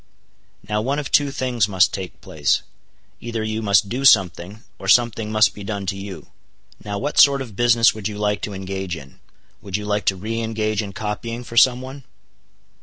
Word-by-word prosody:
"Now 105 +1 -1
one 135 +5 -1
of 150 - -4
two 145 -1 +3
things 125 -6 -1
must 95 -2 +3
take 95 -3 -7
place. 75 -2 0 0.6
Either 115 -1 -4
you 110 +1 -3
must 100 0 +3
do 125 +6 -3
something, 95 -3 +3 0.2
or 95 - -8
something 115 0 +3
must 110 0 +4
be 105 - -9
done 100 -1 -4
to 95 - -2
you. 95 -2 -9 0.5
Now 105 -1 -4
what 145 +9 -1
sort 140 -1 +6
of 120 -7 -7
business 120 +1 +4
would 110 -2 -4
you 105 -1 -6
like 105 0 -1
to 105 - -4
engage 95 -2 -5
in? 70 -3 -14 0.4
Would 100 -1 -3
you 105 - -6
like 105 0 -1
to 95 - +2
re 110 +5 -4
engage 110 -1 -1
in 100 -2 -7
copying 110 +3 -5
for 120 -1 -10
some 125 +2 +5
one?" 135 +2 -9
105 Hz, 195 wpm, -21 LUFS, 100-115 Hz, 0.6 s, sort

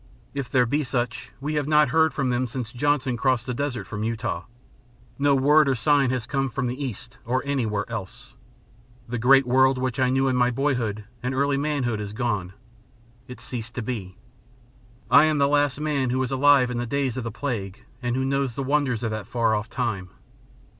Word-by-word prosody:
If 140 -3 -4
there 125 -1 +3
be 145 +6 0
such, 125 -2 -3
we 150 +3 -3
have 150 -2 -1
not 150 -2 +4
heard 160 +3 +3
from 135 -3 -1
them. 125 +1 0
Since 120 -1 -5
Johnson 135 -1 0
crossed 125 -1 +1
the 125 - -3
desert 135 -1 -3
from 105 -1 -6
Utah, 110 -6 -3 0.7
no 140 0 +4
word 145 +3 +5
nor 135 - +2
sign 140 +1 +3
has 125 -2 -2
come 135 -2 -1
from 135 +1 -3
the 125 +4 -3
East 125 0 -7
or 130 +3 -1
anywhere 115 -7 -1
else. - - -7 0.7
The 120 0 -3
great 135 +3 +5
world 130 +1 +4
which 125 0 -2
I 130 -1 +3
knew 135 +1 +2
in 130 - +1
my 125 0 +3
boyhood 120 -5 -1 0.2
and 125 +1 -2
early 140 +1 +2
manhood 135 -6 -1
is 105 0 -6
gone. 105 -6 -2 0.7
It 125 - -9
has - - -9
ceased 120 -1 -6
to 125 - -3
be. 105 -6 -5 0.9
I 140 +4 +8
am 155 -1 +1
the 140 -1 +3
last 145 -1 +2
man 145 -4 0
who 125 - 0
was 130 -1 -1
alive 135 -1 +4
in 120 - -2
the 120 - -3
days 135 -1 -1
of 130 - -3
the 115 - -3
plague 105 -6 -5 0.2
and 120 -1 -1
who 130 0 0
knows 135 -3 -1
the 140 - -2
wonders 135 -4 0
of 110 - -1
that 110 -2 -5
far 115 -2 +1
off 105 +2 -2
time. 95 -7 -3
130 Hz, 210 wpm, -24 LUFS, 120-140 Hz, 0.9 s, I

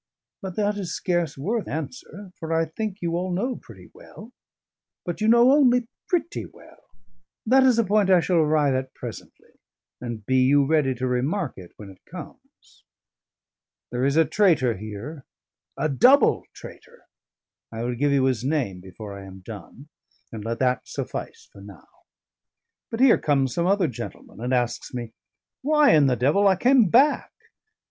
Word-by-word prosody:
But 190 -2 -6
that 205 -1 0
is 190 -4 -4
scarce 175 -5 -1
worth 210 +11 -2
answer, 190 - -7
for 160 0 -6
I 165 0 +2
think 195 +4 -6
you 170 -1 -1
all 180 +1 -2
know 240 +8 -2
pretty - - -15
well. 230 +4 -14 0.7
But 175 +3 -5
you 215 - +2
know 235 +3 +6
only 250 -4 +4 0.2
pretty 340 -2 -2
well: - - -19 0.6
that 260 +4 +5
is 255 -3 +4
a 230 - +4
point 205 -1 +2
I 185 -2 +6
shall 175 +1 0
arrive 150 -3 +2
at 130 0 -3
presently, - - -11 0.4
and 120 -4 -6
be 130 +3 +1
you 140 +2 +4
ready 145 -3 +1
to 130 +2 -3
remark 135 +7 -1
it 90 -2 -13
when 100 -2 -10
it 95 - -20
comes. - - -13 1.1
There 125 +1 -2
is 140 +3 +1
a 165 - +5
traitor 160 - +2
here: 110 - -8 0.5
a 145 - 0
double 245 - +4
traitor: 480 +1 -14 0.7
I 115 0 -5
will 125 +1 -2
give 140 +4 0
you 140 -2 +2
his 130 -3 0
name 130 -10 -1
before 100 +2 -10
I 100 0 -10
am 95 0 -12
done; 110 - -11 0.4
and 110 -2 -7
let 115 +1 -3
that 125 -1 0
suffice - - -6
for 100 - -14
now. 100 -1 -14 1.0
But 225 - -4
here 265 -3 +6
comes 135 -4 +1
some 170 0 0
other 195 -2 +2
gentleman 120 -3 -9
and 125 +1 -3
asks 125 0 -1
me, 120 -2 -6 0.5
'Why, 300 +1 +4
in 150 -3 +5
the 125 - +2
devil, 145 - +2
I 190 - +4
came 245 0 +4
back?' 275 - +3
155 Hz, 170 wpm, -24 LUFS, 125-205 Hz, 1.1 s, know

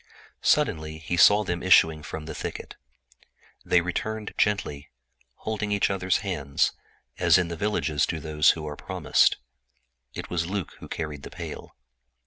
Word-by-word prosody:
Soon 80 - +2 0.2
he 80 +2 -3
saw 100 +4 +6
them 90 -3 -3
issuing 80 -4 +5
from 75 +1 -7
the 80 - -6
thicket. - - -6 0.9
They 90 - +3
returned 105 +5 -4
slowly, 75 -9 0 0.5
holding 110 -1 -3
each 100 -1 +2
other's 95 -1 0
hands 75 -8 0 0.5
as - - +5
in 90 -2 0
the 85 - -4
villages 80 -6 0
do 80 - -3
those 75 0 +3
who 75 -1 -6
are 75 - -5
promised. - - +2 0.8
It - - -5
was 85 -1 -2
Luc 95 -2 -4
who - - -10
carried 75 -3 -5
the - - -9
pail. - - -8
85 Hz, 150 wpm, -26 LUFS, 75-100 Hz, 0.9 s, saw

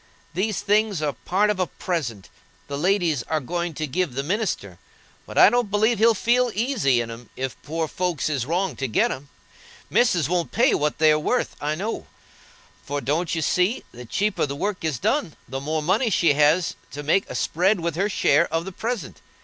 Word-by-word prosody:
These 195 +4 -1
things 210 -2 +2
are 145 -2 0
part 200 - +1
of 200 - -4
a 185 - +1
present, 120 - -4 0.4
the 140 - -4
ladies 170 -3 +1
are 155 +6 -1
going 170 +4 -3
to 155 - -2
give 150 -1 -2
the 135 - -1
minister; 165 - -2 0.5
but - - -8
I - - +8
don't 240 -3 +1
believe 215 +2 +2
he'll 230 +1 +5
feel 245 +4 +2
easy 210 - +2
in 115 -1 -5
'em 115 0 -10
if 130 -1 -3
poor 160 +1 -2
folks 175 -2 -1
is 135 -5 -1
wronged 175 -4 -1
to 135 - -1
get 110 - +2
'em. 140 +2 -7 0.6
Missis 185 - +3
won't 175 0 -1
pay 245 +4 +3
what 150 0 0
they 155 0 +5
are 150 - +3
worth, 250 +11 -1
I 150 +1 -1
know; 210 +7 -4 0.8
for, 145 0 -3
don't 155 +6 -1
you 160 - -1
see, 180 - +1
the 125 0 -10
cheaper 200 - 0
the 140 - -4
work 195 +4 -3
is 155 -5 -1
done, 210 - 0
the 135 +2 -5
more 155 +2 -2
money 210 - +2
she 170 -6 +3
has 150 +4 +3 0.2
to 145 - -6
make 175 +7 +1
a - - -6
spread 185 +4 +1
with 170 -1 -2
her 195 +4 0
share 150 -8 +3
of 165 +1 -1
the 195 - -5
present? 220 - -4
170 Hz, 205 wpm, -24 LUFS, 145-205 Hz, 0.8 s, I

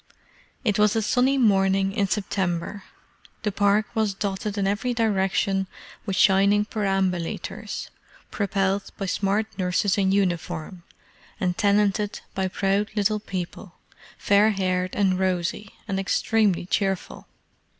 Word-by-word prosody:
It 210 -4 +1
was 210 0 +4
a 225 - +2
sunny 255 +5 +2
morning 195 -4 +3
in 200 -1 0
September. 190 -1 -2 0.6
The 210 - 0
Park 205 +2 +2
was 215 -4 0
dotted 200 +1 -3
in 200 - +1
every 210 +5 -1
direction 195 -3 +1 0.4
with 195 - -1
shining 200 +2 +4
perambulators, 195 -5 -2 0.4
propelled 195 -1 0
by 195 - -3
smart 200 +3 0
nurses 185 +2 +1
in 190 -1 +2
uniform, 175 -2 -1 0.6
and 180 -1 0
tenanted 205 0 +1
by 190 0 -1
proud 195 +2 0
little 210 0 +1
people, 185 -1 -6 0.4
fair 205 +2 +4
haired 185 -2 -1
and 190 -2 +2
rosy, 185 +2 -1 0.2
and 195 -2 -1
extremely 200 -1 +1
cheerful. 195 0 -2
195 Hz, 120 wpm, -24 LUFS, 190-210 Hz, 0.6 s, was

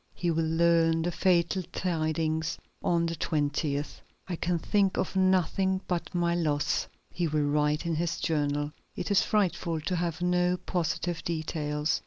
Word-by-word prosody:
He 175 -1 0
will 165 0 +1
learn 165 0 +3
the 175 - 0
fatal 180 +1 +2
tidings 160 -2 -1 0.3
on 170 -1 +2
the 165 0 -2
20th. 145 -1 -1 0.3
"I 180 - -2
can 170 +1 0
think 195 +3 +1
of 190 - -1
nothing 190 0 +2
but 175 0 -3
my 170 -1 +2
loss," 150 -4 0 0.2
he 175 -1 -1
will 150 -1 +1
write 150 +1 +1
in 170 - 0
his 165 +1 -1
journal. 145 -1 0 0.2
"It - - -3
is 200 - +5
frightful 180 -5 0
to 180 +4 -1
have 170 -1 -2
no 180 0 +2
positive 175 -1 -2
details. 155 -2 -1
165 Hz, 155 wpm, -29 LUFS, 155-180 Hz, 0.3 s, is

